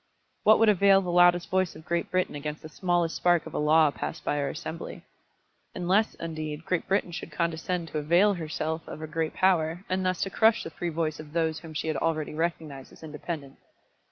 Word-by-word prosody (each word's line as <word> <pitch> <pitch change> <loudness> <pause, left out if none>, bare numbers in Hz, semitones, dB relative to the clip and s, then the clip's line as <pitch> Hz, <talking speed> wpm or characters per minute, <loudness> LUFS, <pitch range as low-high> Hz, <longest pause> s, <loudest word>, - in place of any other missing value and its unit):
What 215 +1 +6
would 225 - +4
avail 195 -1 +5
the 180 -2 -3
loudest 175 0 +4
voice 185 -2 +1
of 155 +1 -13
Great 170 0 -1
Britain 185 0 0
against 150 +1 -5
the 155 - -8
smallest 175 0 0
spark 175 -2 +2
of - - -9
a - - -1
law 155 0 +4
passed 155 +2 -6
by 145 - 0
our 140 - -1
Assembly? 160 +2 -7 0.7
unless, 190 +5 +1
indeed, 155 -1 -5
Great 180 -2 -1
Britain 195 -2 0
should 165 - -7
condescend 170 +1 -2
to 155 - -2
avail 175 +7 +4
herself 160 -1 -4
of - - -7
her 155 - -6
great 160 0 -3
power, 175 -1 +1
and 185 0 0
thus 185 -1 0
to 195 - -4
crush 220 +2 +3
the 165 - -7
free 175 +3 -4
voice 155 -2 -2
of 155 -1 -10
those 160 -2 0
whom 160 -2 -11
she 155 - -2
had 155 -3 -1
already 155 -2 -1
recognised 155 -4 -3
as - - -16
independent. 150 -2 -7
165 Hz, 210 wpm, -27 LUFS, 155-180 Hz, 0.7 s, What